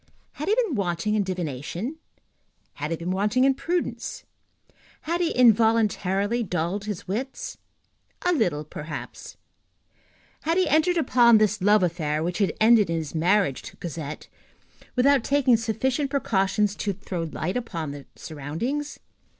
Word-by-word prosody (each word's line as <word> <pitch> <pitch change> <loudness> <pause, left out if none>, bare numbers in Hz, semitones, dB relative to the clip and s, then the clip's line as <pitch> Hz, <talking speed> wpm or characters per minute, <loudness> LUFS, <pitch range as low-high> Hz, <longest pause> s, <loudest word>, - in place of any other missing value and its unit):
Had 300 - -6
he 420 - +3
been 455 -9 +1
wanting 195 -1 -1
in 215 - +2
divination? 180 - -4 0.8
Had 150 +1 -4
he 165 - -2
been 170 +2 -3
wanting 210 +7 +1
in 270 0 +5
prudence? 345 +6 -3 0.8
Had 340 +3 -1
he 340 - +2
involuntarily 220 - +3
dulled 180 0 -2
his 205 -4 -5
wits? 250 +8 -4 0.6
A 360 - +3
little, 175 - 0
perhaps. 150 -4 -8 1.0
Had 330 +3 0
he 370 -2 +3
entered 315 +4 +3
upon 240 -6 +5
this 215 -1 +1
love 205 +1 +4
affair, 155 -3 -1
which 175 +3 -2
had 200 - +2
ended 220 -4 +5
in 165 - 0
his 155 -3 -5
marriage 175 -2 +2
to - - -11
Cosette, 155 -3 -6 0.7
without 270 0 +4
taking 270 -3 +3
sufficient 245 +5 -1
precautions 210 -6 +1
to 200 - -1
throw 180 -1 -5
light 165 +3 -3
upon 170 -12 -3
the 140 -1 -9
surroundings? 170 - -4
210 Hz, 140 wpm, -25 LUFS, 170-255 Hz, 1.0 s, in